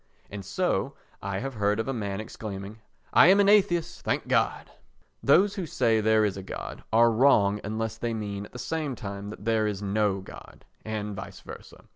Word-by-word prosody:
And 100 -1 -6
so, 95 - -1 0.3
I 100 -1 -3
have 135 +1 -4
heard 105 -1 0
of 115 - -2
a 135 - -1
man 100 -4 -3
exclaiming 105 -1 -7 0.3
"I - - +8
am 195 +2 +6
an 200 - +5
atheist, 175 -5 +3
thank - - -1
God!" - - 0 0.5
Those 190 +9 +4
who 190 -5 -4
say 115 -5 +2
there 110 0 +3
is 100 -2 -2
a - - -5
God 95 - -7
are 115 +1 +5
wrong 110 -4 +4
unless 110 +1 -3
they 115 -1 -2
mean 100 -2 -5
at - - -28
the - - -9
same 155 -1 -3
time 100 -3 -6
that 105 -1 -10
there 110 -1 +2
is 105 -1 -3
no 100 -1 +1
God, 95 - -13 0.2
and 105 -2 -4
vice - - -8
versa. - - -12
110 Hz, 195 wpm, -27 LUFS, 100-125 Hz, 0.5 s, I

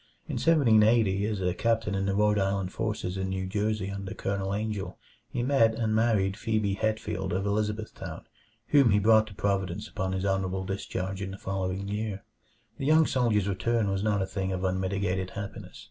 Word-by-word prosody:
In - - -3
1780, 110 -9 +4
as 105 -3 -2
a 90 -1 +1
captain 115 +1 0
in 95 0 -1
the 100 - 0
Rhode 105 0 +3
Island 95 -1 0
forces 105 -4 -2
in 95 0 -2
New 95 0 -2
Jersey 105 0 -1
under 100 -1 -5
Colonel 95 0 -2
Angell, 105 -1 -3 0.3
he 120 - -2
met 120 -4 +3
and 110 -1 0
married 110 -4 +2
Phebe 110 -2 0
Hetfield 110 +1 -2
of 95 +3 -1
Elizabethtown, 105 +1 -3 0.4
whom 140 -5 +6
he 105 - +4
brought 110 +1 +5
to 100 - -11
Providence 100 +1 -1
upon 95 -2 -3
his 95 +1 -2
honorable 95 -1 0
discharge 95 0 -4
in 100 - -3
the 95 - -7
following 95 0 -3
year. 105 -1 -3 0.6
The 135 - -2
young 155 +1 +6
soldier's 115 -8 +1
return 105 +1 0
was 95 0 -1
not 105 -2 +1
a - - -1
thing 95 0 -3
of 95 0 -3
unmitigated 95 0 -1
happiness. 100 -1 -7
100 Hz, 180 wpm, -28 LUFS, 95-110 Hz, 0.6 s, whom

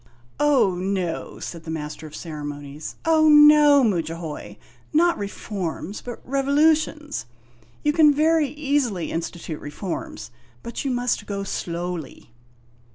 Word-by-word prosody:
"Oh, 290 -10 +4
no!" 180 -2 -3
said 170 -2 -7
the 160 - -9
Master 150 -1 -5
of 150 - -11
Ceremonies; 145 -2 -7
"oh, 315 -1 +5
no, 295 -1 +7
Mudjahoy. 165 -6 -3 0.3
Not 340 +3 +4
reforms, 200 -2 -5
but 245 -1 -9
revolutions. 295 - +1 0.6
You 295 - +2
can 310 -2 +6
very 310 +1 +3
easily 275 - -1
institute 165 -1 -5
reforms; 195 - -6 0.3
but 235 0 -5
you 275 - -1
must 245 -4 -1
go 200 -1 -3
slowly." 175 -8 -5
205 Hz, 115 wpm, -23 LUFS, -, 0.6 s, no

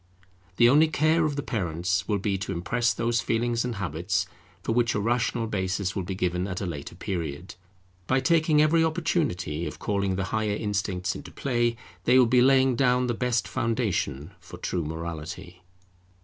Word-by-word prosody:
The 120 - +6
only 150 +6 +6
care 155 +1 +2
of 150 -2 -1
the 145 - -3
parents 90 - -1
will 105 - +1
be 100 0 -1
to 100 - -4
impress 115 +8 0
those 120 -1 0
feelings 115 +3 0
and 125 -2 -3
habits 90 0 -1 0.4
for - - -1
which 120 0 +2
a - - +1
rational 115 +1 0
basis 95 -2 -2
will 95 - -1
be 95 +1 -4
given 90 0 -1
at 90 -2 -4
a 100 - -3
later 80 -2 -6
period. 85 -3 -4 0.5
By 130 - +3
taking 155 +1 +3
every 160 +2 +4
opportunity 155 - -1
of - - -7
calling 100 -2 -1
the 95 - -1
higher 110 -2 0
instincts 100 -2 -2
into - - -8
play, 120 -3 0 0.3
they 125 - +5
will 130 - +7
be 125 +1 +4
laying 130 0 +4
down 125 0 +3
the 120 - 0
best 125 0 0
foundation 110 - -1
for 90 0 -11
true 85 -1 -2
morality. 85 +2 -6
105 Hz, 175 wpm, -26 LUFS, 90-125 Hz, 0.5 s, will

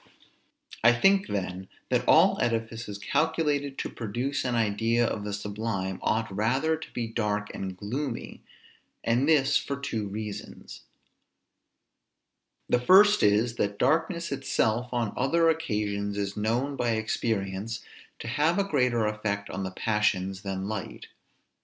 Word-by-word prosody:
I 120 +1 +7
think, 195 +10 +3
then, 95 -1 -3 0.2
that - - +1
all - - +5
edifices 115 -2 -2
calculated 145 +2 0
to - - -2
produce 120 +5 -3
an 125 -2 -1
idea 115 +2 +2
of 105 -2 -2
the 105 - -4
sublime, 105 -2 -3
ought 110 -3 -1
rather 130 +10 +1
to 160 - -10
be 120 - -3
dark 105 -2 -2
and 95 -1 -5
gloomy, 125 +5 -4 0.6
and 120 +6 +2
this 145 -2 +4
for 140 -1 -4
two 110 -7 -3
reasons; 105 +1 -7 1.9
the 125 - +3
first 205 +9 +6
is, 110 +3 +3
that 100 0 -1
darkness 165 - +1
itself 125 -3 0
on 120 -4 -1
other 165 +6 +3
occasions 105 -9 -2
is 100 -1 -2
known 120 +7 0
by 120 -3 0
experience 110 -1 -2 0.3
to - - -8
have 150 +8 +1
a 200 - +3
greater 125 - +1
effect 105 -1 -2
on 95 - -4
the 95 - -2
passions 95 -2 0
than 95 -1 -4
light. 105 -3 -6
115 Hz, 135 wpm, -27 LUFS, 105-135 Hz, 1.9 s, I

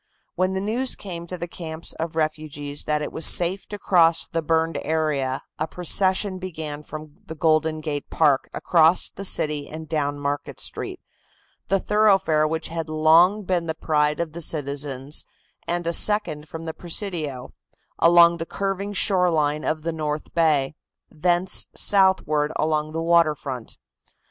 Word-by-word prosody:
When 185 +1 0
the 190 - -2
news 240 +6 0
came 170 -3 -8
to 180 - -6
the 175 - -5
camps 165 -2 -6
of 160 0 -5
refugees 155 -2 -3
that 150 0 0
it - - -5
was - - -5
safe 180 +5 +2
to 205 - -6
cross 165 -4 +3
the 165 - -2
burned 160 -1 0
area 145 -4 -1 0.2
a 155 - -1
procession 185 +3 +1
began 155 -5 -6
from 155 0 -10
the 160 - -7
Golden 155 0 +1
Gate 150 -2 -4
Park 145 -4 +2
across 165 +1 +3
the 195 - -8
city 150 -6 0
and 160 0 -8
down 145 -2 -1
Market 145 0 -4
Street, - - -3 0.7
the 195 - +2
thoroughfare 195 -8 +3
which 160 +1 -3
had 165 -1 -4
long 165 +6 +4
been 180 -3 -1
the 160 - -2
pride 150 -2 0
of 165 -3 -3
the 170 - -6
citizens, 140 -2 -3 0.4
and 175 0 -2
a 170 - 0
second 165 -8 +1
from 165 0 -7
the 160 - -4
Presidio, 165 -8 -3 0.5
along 170 0 +6
the 165 0 -5
curving 200 +1 -3
shore 185 -2 +3
line 150 -2 0
of 155 -1 -2
the 165 0 -2
north 155 -1 -4
bay, 150 -5 +2 0.4
thence 175 +3 +1
southward 185 -7 +3
along 155 0 0
the 165 +1 -3
water 165 -2 +4
front. 130 -5 -7
160 Hz, 160 wpm, -23 LUFS, 150-175 Hz, 0.7 s, along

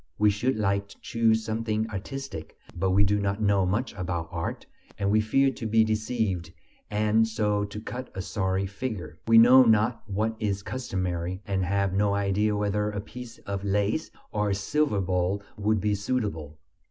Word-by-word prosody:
We 105 0 +4
should 120 +6 0
like 100 -1 0
to - - -16
choose 110 -1 +1
something 110 0 -1
artistic, 105 - -6 0.2
but 95 +2 0
we 100 +2 +4
do 105 +1 +2
not 100 0 -1
know 100 -3 +2
much 110 +6 -1
about 85 -2 -3
art, 85 -1 -4 0.3
and 100 0 0
we 110 +1 +4
fear 135 +5 +3
to 115 -2 -5
be 110 +1 +4
deceived 110 -6 -1 0.4
and 110 +2 +2
so 105 -2 0
to 105 +1 -7
cut 125 +3 -6
a 95 - -3
sorry 95 0 -1
figure; 100 -5 -5
we 115 0 +6
know 125 +3 +9
not 115 0 +3
what 110 +3 -1
is 100 -2 -1
customary 95 -6 -3
and 95 -2 0
have 100 0 0
no 100 0 +2
idea 100 +1 +1
whether 105 0 0
a 105 -1 -4
piece 115 +3 -9
of 100 -1 -3
lace 105 +9 0 0.2
or 105 -1 0
a 100 - +1
silver 105 +1 +1
bowl 90 +2 0
would 105 0 +1
be 105 +2 +1
suitable. 100 - -2
105 Hz, 175 wpm, -27 LUFS, 95-110 Hz, 0.4 s, know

